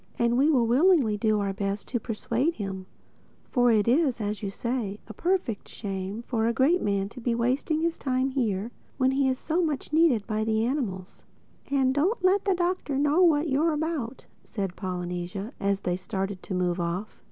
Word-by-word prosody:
"And 235 0 +2
we 275 +5 +4
will 255 -7 +4
willingly 265 - +4
do 215 0 +1
our 200 -1 -1
very 200 0 -2
best 200 +1 -5
to 240 - -1
persuade 235 +7 -1
him—for 195 +5 -3
it 215 -2 +3
is, 265 -1 +3
as 210 -1 -3
you 200 - -2
say, 215 -1 -3
a 220 - -8
perfect 340 - -1
shame 195 +1 -5
for 225 -2 0
the 235 - +1
great 285 +10 +3
man 200 -1 0
to 245 - -11
be 235 0 0
wasting 260 +7 0
his 335 0 -1
time 260 0 0
here 225 -4 -1 0.3
when 260 -1 +3
he 270 0 +2
is 260 - 0
so 325 +6 0
much 305 -3 -2
needed 305 -10 +4
by 215 -1 -1
the 220 0 +1
animals." 215 -9 -3 0.5
"And 265 -2 +2
don't 365 - +1
let 385 +2 +3
the 390 -2 +3
Doctor 350 -5 -1
know 295 +5 +3
what 325 -3 +4
you're 310 +4 +2
about," 300 -6 -3 0.2
said 195 -5 -4
Polynesia 180 +3 -4
as 200 -1 0
they 180 0 -1
started 190 0 -4
to 190 - -5
move 180 0 0
off. 175 +5 -3
235 Hz, 190 wpm, -27 LUFS, 200-290 Hz, 0.5 s, we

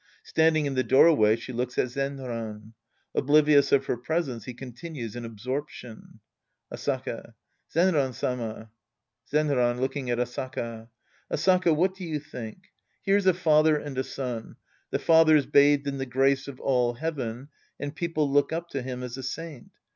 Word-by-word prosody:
Standing 160 -1 +2
in 140 - -1
the 130 -1 +1
doorway, 130 -7 +5
she 115 +2 -8
looks 125 +1 -3
at 125 - +1
Zenran. 120 -6 -5 0.4
Oblivious 145 0 +4
of 135 -1 +4
her 125 - -1
presence, 130 -2 -2
he 125 - -6
continues 125 -1 -7
in 120 - -5
absorption^ 120 +1 -7 0.6
Asaka. - - -4 0.4
Zenran 155 -7 +2
Sama. 110 -3 -4 0.6
Zenran 135 -5 +2
{looking 130 0 -2
at 120 - +1
Asaka). 120 -2 -4 0.4
Asaka, 180 0 +3
what 185 +4 +2
do 190 0 -10
you 155 -3 -3
think? 145 +3 -9 0.3
Here's 195 0 +2
a 185 - +6
father 155 -3 +4
and 145 -2 -6
a 130 - 0
son. 125 -4 -5 0.3
The - - -2
lather's 160 -3 +6
bathed 145 0 +4
in 140 -1 -3
the 135 - -3
grace 135 +2 +2
of 140 -2 -8
all 125 -3 +1
heaven, 135 -3 -4 0.3
and 145 +1 -5
people 155 -2 -1
look 140 +1 +2
up 170 +1 -3
to 135 - -3
him 125 0 -5
as 125 0 -6
a 130 - -6
saint. 150 0 -6
135 Hz, 155 wpm, -27 LUFS, 125-155 Hz, 0.6 s, a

